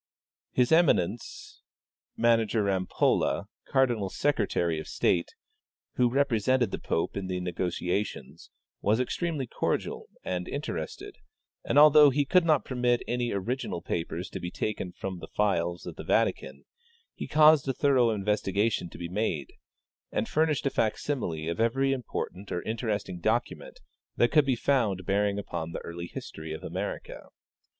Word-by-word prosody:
His 125 +2 +2
emi 165 -1 +6
nence, 95 +6 -5 0.6
Mgr 115 -2 +2
Rampolla, 95 -2 +1 0.2
cardinal 120 -7 +2
secretary 95 - 0
of 80 - -7
state, 85 -1 0 0.6
who 125 -1 +3
repre 135 -1 +2
sented 125 -2 +2
the - - -3
pope 80 - -1
in 95 -1 -3
the 90 -1 -2
negotiations, 90 +2 -3 0.3
was 105 +3 +2
extremely 150 +2 -1
cordial - - -2 0.2
and 90 -1 -3
interested, - - -5 0.5
and - - 0
although 150 0 +8
he 140 +2 +1
could 180 +5 +4
not 155 -4 +3
permit 125 -2 +1
any 120 0 -1
original 105 0 -2
papers 85 +2 -3
to - - -5
be 90 - -4
taken 95 -2 -3
from 95 0 -6
the - - -8
files 85 -4 0
of - - -7
the - - -6
Vatican, - - 0 0.5
he - - -6
caused 155 -2 +6
a - - +2
thorough 130 -3 +3
investigation 105 -2 0
to - - -11
be 85 - -5
made, 90 -7 -2 0.6
and - - -1
furnished 155 -2 +1
a 140 - +2
fac 110 -1 +1
simile 85 - -3
of 85 +5 -3
every 135 +4 +2
important 105 -6 -5
or 90 - -2
interesting 110 -5 -3
document 110 +6 -2 0.3
that 120 - +3
could 150 -3 +4
be 130 - +3
found 115 -8 +1
bearing 100 +1 +1
upon 85 -5 -4
the - - -3
early 85 +1 -6
history 80 -1 -7
of 80 - -8
America. - - -5
110 Hz, 150 wpm, -28 LUFS, 90-130 Hz, 0.6 s, although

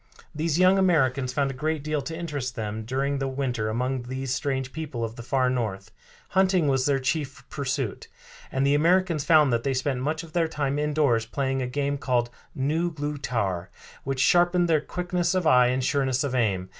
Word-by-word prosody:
These 155 +1 -1
young 185 +2 +5
Americans 135 -8 +2
found 140 0 0
a - - -7
great 155 +2 -2
deal 155 -1 -1
to 160 +4 -6
interest 145 -7 -4
them 110 -1 -4
during 135 +3 -1
the 135 - -1
winter 130 -5 -2
among 125 +3 -1
these 130 +1 -4
strange 130 +1 -2
people 150 -7 -4
of 115 0 -4
the 120 - -8
far 130 +1 +1
North. 110 -5 -2 0.4
Hunting 190 -4 +3
was 135 -1 +2
their 140 -1 +3
chief 135 0 -3
pursuit, 135 -5 -3 0.4
and 135 +1 0
the 140 - +3
Americans 170 0 +2
found 150 -4 +5
that 115 - +1
they 135 -1 0
spent 130 0 -1
much 155 +4 -2
of 160 -2 -13
their 170 -2 +2
time 145 -2 -2
indoors 145 -7 +1
playing 135 +1 -1
a 125 - -2
game 140 +2 -2
called 120 -3 0 0.2
Nu 155 +6 0
glew 150 -2 -4
tar, 100 -10 -2 0.3
which 135 -1 -3
sharpened 175 +4 +4
their 160 -3 +3
quickness 180 +1 -1
of 185 -2 0
eye 125 -4 +6
and 130 +1 0
sureness 130 -1 +1
of 140 -3 -2
aim. 100 -7 0
135 Hz, 195 wpm, -26 LUFS, 125-155 Hz, 0.4 s, eye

